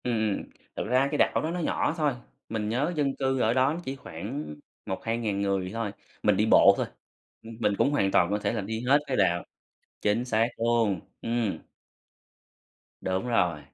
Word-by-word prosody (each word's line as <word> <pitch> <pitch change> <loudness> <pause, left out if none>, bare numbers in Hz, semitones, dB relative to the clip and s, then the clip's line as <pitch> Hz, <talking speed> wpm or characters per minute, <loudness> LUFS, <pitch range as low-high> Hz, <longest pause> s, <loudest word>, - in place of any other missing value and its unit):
Ừm, 110 -4 0 0.3
thực - - -3
ra 130 +3 +3
cái 150 - 0
đảo - - +3
đó 160 - -2
nó 180 - -3
nhỏ 155 - 0
thôi, 150 -3 +2 0.4
mình 110 -1 -2
nhớ 135 +10 0
dân 140 -3 0
cư 135 -1 0
ở 115 -1 +3
đó 130 +3 +3
nó 170 - -4
chỉ 135 - -3
khoảng 110 - -6 0.3
1000-2000 110 +1 -2
người 95 -2 0
thôi, 115 -3 -2 0.3
mình 105 -2 +4
đi 105 - +3
bộ 110 - +7
thôi, - - 0 0.6
ưm, 115 0 -9
mình 105 - +2
cũng 140 - +3
hoàn 100 -9 +2
toàn 85 - +4
có 105 +1 0
thể - - -1
là 110 - -1
đi 110 +3 -4
hết 140 +3 +6
cái 130 - -1
đạo 85 -3 +2 0.6
chính 105 +4 +1
xác 115 -2 +2
luôn, 115 -4 +2 0.2
ừm. 115 -6 -1 1.4
Đúng 95 +4 -1
rồi, 90 -9 +2
115 Hz, 190 wpm, -27 LUFS, 100-130 Hz, 1.4 s, bộ